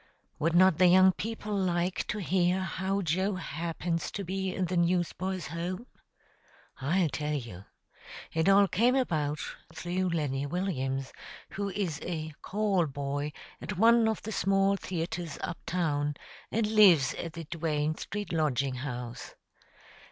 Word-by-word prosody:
Would 165 +2 +1
not 185 -2 +5
the 185 - +7
young 185 +1 +7
people 215 +1 -4
like 180 -1 0
to - - -2
hear 185 -1 +1
how 190 +2 -1
Joe 185 +5 0
happens 165 0 -3
to 200 - -3
be 190 +1 -2
in 185 - -1
the 180 +1 -2
Newsboys' 175 0 0
Home? 175 +7 -4 0.9
I'll 165 +5 +1
tell 150 +1 -2
you. 110 -9 -6 0.7
It 160 +3 +2
all 200 0 +6
came 240 +7 +3
about 155 - 0 0.3
through 175 +3 -2
Lenny 145 -4 -1
Williams, 135 -6 -2 0.4
who 200 0 -3
is 185 -7 -2
a 160 -3 -4
"call 200 -4 +1
boy" 145 +1 -3 0.3
at 205 - -5
one 230 +2 +6
of 220 - -1
the 220 - -5
small 195 -1 +2
theatres 175 -3 -4
up 170 - -4
town, 150 -4 0 0.4
and 225 0 +1
lives 200 -10 +6
at 165 -2 -6
the 165 - -6
Duane 155 -2 -1
Street 205 -1 -5
Lodging 140 -5 0
House. 125 -3 -6
175 Hz, 145 wpm, -29 LUFS, 150-190 Hz, 0.9 s, the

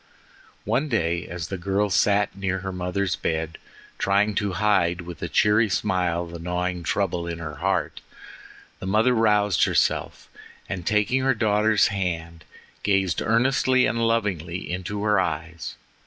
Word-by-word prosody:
One 150 +3 0
day 85 -7 0
as 85 -2 -6
the 95 - -4
girl 100 +3 0
sat 100 +1 +2
near 95 -1 -2
her 95 - -2
mother's 90 +1 -1
bed, 80 0 -3 0.4
trying 100 +2 +2
to 100 -1 -1
hide 90 -3 +2
with 85 -1 -9
a - - -2
cheery 105 +1 +3
smile 90 -3 0
the 85 0 -9
gnawing 90 +1 -2
trouble 85 -1 -1
at 85 -1 -4
her 75 -4 -7
heart, - - -1 0.8
the 95 - -6
mother 110 +6 +3
roused 105 -4 +3
herself - - 0 0.4
and 90 -3 -5
taking 105 +5 +2
her 135 -1 +2
daughter's 105 -1 +3
hand, 85 -4 -4 0.4
gazed 95 -3 +1
earnestly 130 +2 +3
and 115 -1 +1
lovingly 95 -7 -2
into 95 +3 -4
her 105 -2 +3
eyes. 85 -1 -3
95 Hz, 145 wpm, -24 LUFS, 85-105 Hz, 0.8 s, cheery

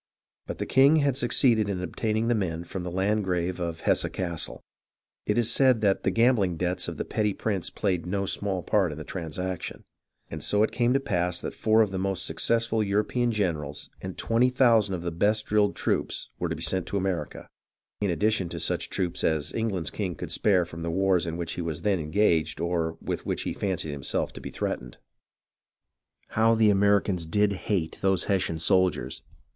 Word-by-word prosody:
But - - -5
the - - -3
king 135 +4 +5
had 140 -4 +2
succeeded 120 -4 +3
in 95 -2 -2
obtaining 110 +4 -1
the 120 - +3
men 85 -6 -2
from 90 +2 -6
the 90 - -4
Landgrave 95 -2 0
of 85 -2 -4
Hesse - - +2
Cassel 85 -3 -3 0.6
(it 105 - +1
is 115 -1 +2
said 130 -3 +4
the 100 -2 +2
gambhng 115 -7 +2
debts 90 +1 -1
of - - -5
the - - -3
petty 105 -2 0
prince 100 -5 -2
played 90 -4 -1
no 100 +2 -1
small 95 -2 -1
part 95 -6 +2
in 75 - -7
the 80 - -6
transaction), 90 +2 -5 0.5
and 80 -2 -5
so 105 +1 +3
it - - +1
came 120 0 +1
to 135 - +3
pass 90 -10 -1
that - - -5
four 110 0 +3
of 105 - -3
the 95 - -3
most 95 -1 -1
successful 115 +7 +1
of 105 - -1
European 110 +4 +1
generals 80 -9 -2
and 95 -1 -6
twenty 120 +2 +2
thousand 115 -6 +3
of 85 - -6
the 85 - -2
best 105 +6 +1
drilled 105 -1 +2
troops - - -2
were 90 - -1
to 80 - -2
be 80 - -3
sent 90 +2 0
to 100 - -1
America, 90 -5 -3 0.5
in 100 - 0
addition 100 0 +1
to - - -5
such - - -1
troops 90 -2 -2
as 80 -2 0
England's 105 -7 -1
king 95 -5 -3
could - - -7
spare 95 -4 +2
from 85 -1 -9
the 85 - -2
wars 95 -1 +2
in 85 0 -3
which 85 -1 -3
he - - -4
was 80 -3 -4
then 100 -3 +2
engaged 80 +1 +1
or 85 -2 -1
with - - -4
which - - -1
he - - -3
fancied 90 -6 -2
himself 70 -2 -2
to - - -9
be - - -6
threatened. - - -4 1.3
How 115 +1 +3
the 110 -2 +5
Americans 100 -3 +2
did 105 +4 +2
hate 90 -4 -2
those 95 -3 +2
Hessian 95 -4 0
soldiers 80 -6 +1
95 Hz, 195 wpm, -27 LUFS, 85-105 Hz, 1.3 s, king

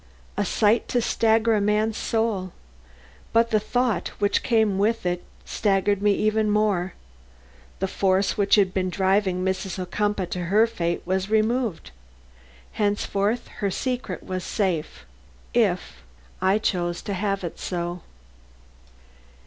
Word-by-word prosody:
A 205 - 0
sight 215 +4 +2
to 245 - +1
stagger 225 -1 +2
a 210 - +2
man's 210 +2 +1
soul! 220 -6 -1 0.8
But 230 0 +3
the 215 - +4
thought 245 +1 0
which 205 0 +1
came 220 -4 +2
with 225 +1 +1
it 175 0 -1 0.2
staggered 200 -1 +1
me 205 +1 +2
still 215 0 +2
more. 205 -4 +1 0.8
The 190 - -1
force 190 +1 +1
which 200 -1 +4
had 195 -3 +3
been 185 -1 0
driving 190 -1 +1
Mrs. 190 0 -2
Ocumpaugh 200 +2 -1
to 180 -1 -3
her 210 +6 +4
fate 175 -7 -2
was 190 +2 -1
removed. 220 - 0 0.8
Henceforth 205 +2 0
her 200 -2 0
secret 250 +5 -3
was 185 -1 -4
safe 165 - -2 0.5
if - - +5
if 65 +1 -15 0.4
I 190 +2 +3
chose 175 -5 -1
to 200 - -3
have 195 0 -1
it 170 - -6
so. 175 -1 -3
200 Hz, 135 wpm, -24 LUFS, 185-215 Hz, 0.8 s, if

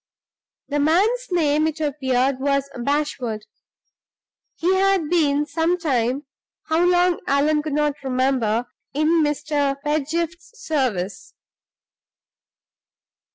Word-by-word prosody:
The 290 0 -1
man's 405 +12 +2
name, 310 -3 +2
it 315 0 -4
appeared 265 -3 0
was 275 0 0
Bashwood. 250 -4 -2 1.1
He 355 +3 +1
had 380 -4 +2
been 295 -4 +2
some 325 +4 0
time 270 -4 0 0.4
(how 320 +2 +1
long, 355 0 +3
Allan 300 +2 +2
could 300 -1 -4
not 295 0 +1
remember) 255 -3 +1 0.3
in 315 +2 +3
Mr. 290 -2 0
Pedgift's 325 +8 -2
service. 205 - -2
295 Hz, 100 wpm, -22 LUFS, 270-325 Hz, 1.1 s, long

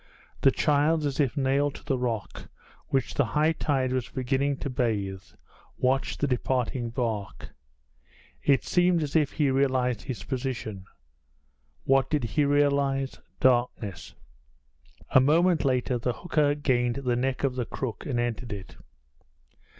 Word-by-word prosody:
The 135 - +6
child, 150 +2 +2
as 140 0 -2
if 140 -3 +1
nailed 140 +1 +1
to - - -11
the 140 -2 +1
rock, 115 -5 -4 0.4
which 135 -2 0
the - - +2
high 155 +2 +4
tide 135 -5 0
was 130 -2 -2
beginning 135 +2 0
to 140 - -2
bathe, 100 -6 -1 0.6
watched 130 +1 0
the 145 - +2
departing 125 -1 -1
bark. 115 -5 -3 0.9
It 135 - +3
seemed 175 -2 +2
as 145 0 -5
if 150 -3 +2
he 145 -3 +1
realized 130 -4 +1
his 130 -4 -6
position. 125 -7 -4 1.0
What 135 -1 +3
did 150 -4 0
he 115 +6 +1
realize? 140 -1 +1 0.2
Darkness. 120 -7 0 1.0
A - - +7
moment 165 +5 +3
later 125 -1 +1
the 120 +1 -1
hooker 150 -3 +1
gained 125 -5 +1
the 125 -3 -1
neck 130 +2 -1
of 135 -2 +1
the 125 -2 -2
crook 115 -5 -5
and 125 -4 -1
entered 120 0 -2
it. 100 -2 -8
130 Hz, 140 wpm, -27 LUFS, 120-145 Hz, 1.0 s, A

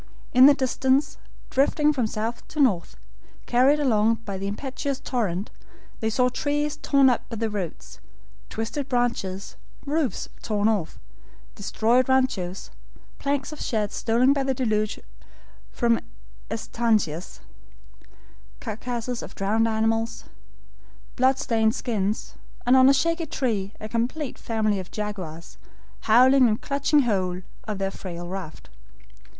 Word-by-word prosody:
In 255 +2 +9
the 285 - +7
distance, 270 +2 +1 0.3
drifting 295 +2 +3
from 250 -6 0
south 220 +2 -4
to 310 - -7
north, 200 - +2 0.5
carried 265 +5 +4
along 230 -5 +3
by 200 -2 -4
the 195 - -3
impetuous 270 +5 -3
torrent, 205 -7 -2 0.5
they 220 - 0
saw 250 +3 +2
trees 290 +3 -1
torn 275 -1 +4
up 245 -3 +1
by 230 - -5
the 225 0 -2
roots, 170 - -6 0.5
twisted 260 +5 -4
branches, 235 -6 -1 0.3
roofs 295 -2 -1
torn 210 -1 0
off, 205 -7 0 0.6
destroyed 230 +5 +1
RANCHOS, 235 -9 0 0.5
planks 280 0 -1
of 305 - -8
sheds 210 -3 -1
stolen 245 +4 +3
by 280 - 0
the 265 -1 0
deluge 215 -4 0 0.7
from 235 -2 +2 0.5
ESTANCIAS, 205 - -1 1.2
carcasses 240 +1 -4
of - - -9
drowned 215 +3 +1
animals, 225 +1 0 0.9
blood 260 +1 +3
stained 225 -4 +1
skins, 210 -4 -2 0.3
and 250 +2 +5
on 260 0 +7
a - - +6
shaky 330 +2 0
tree 210 -9 -1
a 215 - -6
complete 245 +6 -2
family 215 -3 0
of 185 - -7
jaguars, 185 -6 -6 0.5
howling 255 +3 +7
and 215 -1 0
clutching 285 +1 +2
hold 185 -6 -1 0.2
of 215 -2 -3
their 195 0 -1
frail 175 -3 -7
raft. 180 - -7
230 Hz, 130 wpm, -25 LUFS, 210-265 Hz, 1.2 s, In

